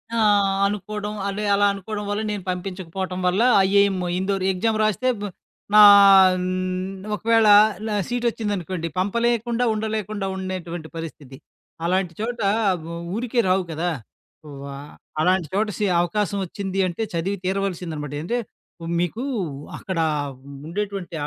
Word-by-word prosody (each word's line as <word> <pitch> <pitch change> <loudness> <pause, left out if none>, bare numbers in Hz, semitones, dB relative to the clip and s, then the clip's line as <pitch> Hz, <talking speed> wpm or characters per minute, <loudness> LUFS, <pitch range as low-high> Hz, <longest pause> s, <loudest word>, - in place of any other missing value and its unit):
ఆ! - - 0 0.5
అనుకోడం. 210 +1 -3 0.2
అదె 205 +2 -3
అలా 205 0 +3
అనుకోడం 205 +2 -5
వల్ల 205 +1 -1
నేను 205 -3 -4
పంపించకపోటం 185 0 -4
వల్ల 185 +4 +2 0.3
ఐఏఎమ్ 200 -1 +3 0.2
ఇందోరు 190 0 -1
ఎగ్జామ్ 220 +4 0
రాస్తే 215 +4 +1
బ్ - - -4 0.5
నా 210 - +8 0.5
హ్, 180 0 -2 0.7
ఒకవేళ 225 +2 +3 0.4
నా 215 - -1
సీటొచ్చిందనుకోండి, 205 -8 -2
పంపలేకుండా 235 +4 0
ఉండలేకుండా 215 -2 -3
ఉండేటువంటి 180 -3 -5
పరిస్థితి. 150 -5 -8 0.5
అలాంటి 180 0 0
చోట 235 +2 -3 0.8
ఊరికే 240 +1 -1
రావు 185 +1 +2
గదా! 165 +3 -1 0.6
వ్వా 140 -1 -8 0.5
అలాంటి 180 0 +2
చోట 210 +2 +1
సి 210 - 0
అవకాశమోచ్చింది 195 +1 -2
అంటే 180 +5 -3
చదివి 180 +4 -1
తీరవల్సిందనమాట. 180 -6 -3
ఏంటే 205 +10 -2 0.6
మీకు 175 +8 -2 0.5
అక్కడ 185 -3 -4 0.7
ఉండేటువంటి 195 -1 -4
195 Hz, 115 wpm, -23 LUFS, 180-210 Hz, 0.8 s, నా